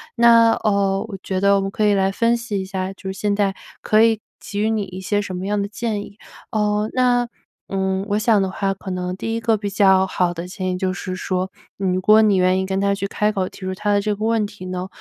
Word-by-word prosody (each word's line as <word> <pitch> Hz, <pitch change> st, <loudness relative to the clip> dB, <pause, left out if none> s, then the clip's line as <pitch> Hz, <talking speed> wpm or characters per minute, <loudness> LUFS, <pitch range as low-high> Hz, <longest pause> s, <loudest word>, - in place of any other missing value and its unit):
那， 230 Hz, -1 st, +6 dB
嗯， 200 Hz, -2 st, +2 dB
我 -, -, -7 dB
觉 190 Hz, -1 st, -2 dB
得 200 Hz, +1 st, +4 dB
我 -, -, +1 dB
们 195 Hz, -, -2 dB
可 210 Hz, +2 st, 0 dB
以 205 Hz, -, +4 dB
来 195 Hz, -1 st, +2 dB
分 230 Hz, +4 st, +2 dB
析 230 Hz, -4 st, -3 dB
一 190 Hz, -, -4 dB
下 190 Hz, -1 st, -3 dB, 0.2 s
现 200 Hz, +1 st, -1 dB
在 200 Hz, -1 st, +1 dB, 0.3 s
可 215 Hz, 0 st, +4 dB
以 225 Hz, -1 st, +4 dB, 0.2 s
给 205 Hz, -, -6 dB
予 215 Hz, -, +2 dB
你 220 Hz, -2 st, 0 dB
一 185 Hz, -1 st, -8 dB
些 205 Hz, +2 st, 0 dB
什 190 Hz, -2 st, -5 dB
么 185 Hz, -, -4 dB
样 205 Hz, 0 st, 0 dB
的 200 Hz, -, -2 dB
建 210 Hz, 0 st, -3 dB
议。 205 Hz, 0 st, -11 dB, 0.3 s
嗯， 210 Hz, 0 st, 0 dB
那， 245 Hz, -1 st, +2 dB, 0.4 s
嗯， 190 Hz, 0 st, -1 dB
我 205 Hz, -, +1 dB
想 215 Hz, -1 st, +3 dB
的 190 Hz, -, 0 dB
话 195 Hz, +1 st, -1 dB
可 195 Hz, 0 st, -9 dB
能 180 Hz, 0 st, -3 dB
第 225 Hz, +4 st, -3 dB
一 -, -, -1 dB
个 225 Hz, -1 st, +2 dB
比 205 Hz, -1 st, -3 dB
较 190 Hz, -1 st, +4 dB
好 180 Hz, -2 st, 0 dB
的 170 Hz, +1 st, -6 dB
建 185 Hz, 0 st, -3 dB
议 180 Hz, -, -2 dB
就 185 Hz, 0 st, 0 dB
是 185 Hz, -1 st, -5 dB
说， 185 Hz, 0 st, -2 dB, 0.3 s
如 185 Hz, -1 st, 0 dB
果 215 Hz, +3 st, +6 dB
你 205 Hz, -3 st, +4 dB
愿 185 Hz, +1 st, +3 dB
意 190 Hz, -, -1 dB
跟 190 Hz, +1 st, -1 dB
他 200 Hz, 0 st, +2 dB
去 200 Hz, 0 st, -3 dB
开 210 Hz, +1 st, 0 dB
口 190 Hz, -3 st, -1 dB
提 -, -, -12 dB
出 185 Hz, 0 st, -3 dB
他 205 Hz, +1 st, 0 dB
的 205 Hz, -, +3 dB
这 210 Hz, 0 st, -1 dB
个 215 Hz, +2 st, -3 dB
问 225 Hz, -2 st, +1 dB
题 205 Hz, -2 st, -11 dB
呢， 185 Hz, 0 st, -4 dB
200 Hz, 275 characters per minute, -21 LUFS, 190-215 Hz, 0.4 s, 那